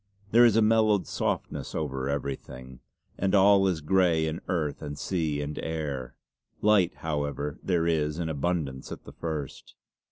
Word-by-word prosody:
There 120 +2 +7
is 115 -3 +4
a 115 - +5
mellowed 110 -4 +3
softness - - -3
over 65 -3 -2
everything, 65 -2 -5 0.4
and 95 +1 +2
all 100 0 +6
is 85 -4 -1
grey 85 -1 +3
in 80 +1 -3
earth 75 -5 -1
and 75 0 -6
sea 80 -6 -1
and 75 +1 -5
air. 75 -5 -4 0.4
Light, 105 -4 +3
however, 75 -1 -2
there 85 -3 +1
is 75 -2 0
in 85 -2 -2
abundance 75 -3 -2
at - - -7
the - - -12
first. 75 -5 -6
80 Hz, 155 wpm, -27 LUFS, 70-95 Hz, 0.4 s, There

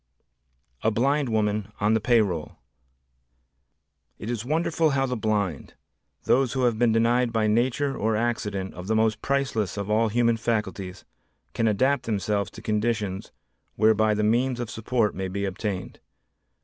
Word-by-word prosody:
A 110 - +2
Blind 135 +5 +1
Woman 105 -1 0
on 105 +2 +2
the 110 - +3
Pay 115 +1 +4
Roll 90 -7 -3 1.6
It 110 - -5
is 115 -2 -3
wonderful 160 +3 +1
how 135 -1 +1
the 125 -1 -2
blind, 105 - -2 0.5
those 130 -1 +2
who 130 -1 0
have 120 -3 +1
been 120 -2 +4
denied 115 +2 +2
by 110 -1 +1
nature 130 +6 +1
or 110 +1 0
accident 105 -4 -2
of 90 +2 -8
the 110 - +1
most 110 0 +1
priceless 130 -9 -1
of 100 +1 -3
all 110 +1 +3
human 115 +1 +2
faculties, 105 -4 -3 0.5
can 115 - +1
adapt 130 +7 +1
themselves 100 -1 -1
to - - -12
conditions 105 -3 -1 0.4
whereby 110 0 +3
the 105 - 0
means 120 +3 +1
of 120 -3 -4
support 115 -1 0
may 95 0 -3
be 100 +2 -3
obtained. 95 -1 -4
110 Hz, 155 wpm, -25 LUFS, 105-120 Hz, 1.6 s, Pay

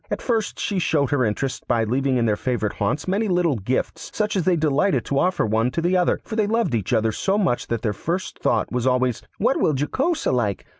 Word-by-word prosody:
At - - -2
first 225 -4 -1
she 200 - -1
showed 145 -6 +1
her 140 -3 +2
interest 125 +4 -2
by 115 -2 +2
leaving 130 +4 0
in 120 - +1
their 105 -2 +2
favourite 120 -3 -2
haunts 105 - -1
many 205 +4 0
little 175 - +1
gifts 115 +6 -3
such 210 -1 0
as 185 -4 0
they 185 - +3
delighted 155 +4 +1
to 140 - 0
offer 180 -4 +1
one 110 +3 +1
to 165 - -3
the 175 +2 +1
other, 180 -1 +2
for 220 - -6
they 215 -2 +1
loved 225 - 0
each 110 -5 -1
other 110 -2 +2
so 195 - 0
much 180 -12 0
that 115 -2 -3
their 110 -3 0
first 175 - -4
thought - - 0
was 125 0 -1
always, 125 -2 +1 0.2
'What - - +2
will 150 - +2
Jocosa 275 - 0
like? 105 -6 -1
140 Hz, 235 wpm, -22 LUFS, 120-185 Hz, 0.2 s, they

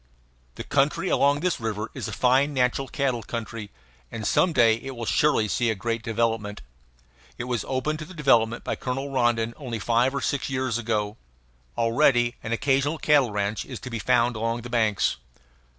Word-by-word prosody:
The - - -6
country 145 +7 +1
along 145 +1 +3
this 180 0 0
river 110 -1 -3
is - - -5
a - - -5
fine 130 +6 +2
natural 130 +1 +1
cattle 130 -5 -1
country, 110 -1 -6 0.4
and 110 -2 -5
some 180 - +3
day 115 -6 +4
it 135 +2 -8
will 115 -1 -5
surely 145 -4 +2
see 120 +3 0
a 110 - 0
great 115 +3 -2
development. 115 - -2 0.7
It - - -4
was 120 -3 -2
opened 150 +4 -1
to 155 - -6
development 130 -9 +2
by - - -3
Colonel 135 +2 -3
Rondon 120 -3 +1
only 125 -6 -5
five 120 +5 +1
or - - -1
six 140 -2 -1
years 130 -3 -1
ago. 105 -2 -2 0.6
Already 120 +1 +3
an 110 - -6
occasional 135 +5 +1
cattle 145 -5 +3
ranch 105 0 -1
is 125 -4 -8
to 125 - -7
be 115 - -3
found 115 +3 +2
along 115 +2 -2
the 120 - -8
banks. 110 -4 +1
120 Hz, 180 wpm, -25 LUFS, 115-135 Hz, 0.7 s, day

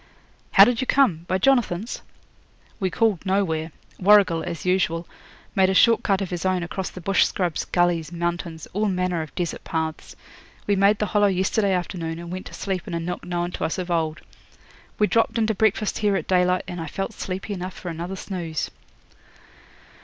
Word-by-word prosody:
'How - - +10
did 245 -1 +1
you 260 - -2
come; 180 - +3
by 185 - +1
Jonathan's?' 225 -3 +1 0.8
'We 190 -3 0
called 210 -1 +1
nowhere. 175 -5 0 0.3
Warrigal, 195 -4 +5
as 175 -1 -5
usual, 180 -2 +1 0.5
made 190 -1 +4
a 190 - +1
short 230 +4 +5
cut 195 -2 +1
of 190 - -4
his 175 -2 -3
own 185 -2 +1
across 185 +2 -4
the - - -10
bush 195 +2 +3
scrubs, 175 -5 -1
gullies, 175 -2 +1
mountains, 170 -1 -3
all 210 +3 +1
manner 180 -3 0
of 155 - -8
desert 175 -2 -3
paths. 160 -1 -4 0.5
We 205 - +2
made 200 +2 +4
the 210 - 0
Hollow 205 0 +3
yesterday 195 +2 +1
afternoon, 170 -2 -3
and 170 0 -8
went 185 +1 -5
to - - -12
sleep 190 -3 -3
in - - -3
a - - -1
nook 175 +2 -4
known 175 0 -2
to - - -5
us 160 - -1
of 180 -1 -4
old. 160 -2 -1 0.8
We 210 - +4
dropped 230 +2 +1
in 225 - +2
to 220 - +1
breakfast 215 0 +1
here 205 -2 +2
at - - -2
daylight, 180 0 +2
and 175 -2 -5
I 160 - -5
felt 195 +7 -4
sleepy 195 +1 -5
enough 185 -1 -5
for 180 - -7
another 170 +3 -5
snooze.' 175 -5 -4
185 Hz, 190 wpm, -24 LUFS, 170-200 Hz, 0.8 s, How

